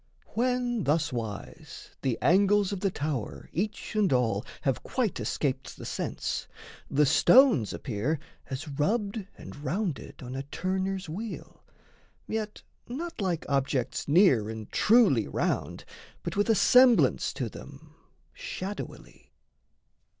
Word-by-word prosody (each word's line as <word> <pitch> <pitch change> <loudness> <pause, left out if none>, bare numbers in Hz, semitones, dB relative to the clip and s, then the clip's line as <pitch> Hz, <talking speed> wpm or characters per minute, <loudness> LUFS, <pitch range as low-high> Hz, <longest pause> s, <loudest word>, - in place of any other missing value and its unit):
When 245 -2 0
thuswise 125 -9 -3
The 130 -4 0
angles 200 +2 +4
of 200 - -3
the 195 0 +1
tower 145 - -4
each 205 +5 -3
and 210 -3 +3
all 115 -5 +2 0.2
Have 135 -3 0
quite 245 -8 -1
escaped 135 -2 -2
the - - -8
sense, - - -3 0.4
the 150 +2 +3
stones 160 - +5
appear 130 +6 -2 0.3
As 135 +4 -5
rubbed 200 +8 -1
and - - -10
rounded 170 -1 -3
on 125 +1 -6
a 135 - -2
turner's 185 +6 -2
wheel 205 +8 -7 0.6
Yet 215 -1 -4 0.2
not 325 +3 -5
like 180 -4 -1
objects 135 -2 -1
near 145 - +5
and 110 -1 -7
truly 210 - +4
round, - - -2 0.4
But - - -4
with 205 +2 +1
a 225 - +5
semblance 250 +3 +5
to - - -3
them, - - -12 0.4
shadowily. 205 - -7
180 Hz, 120 wpm, -28 LUFS, 135-215 Hz, 0.6 s, stones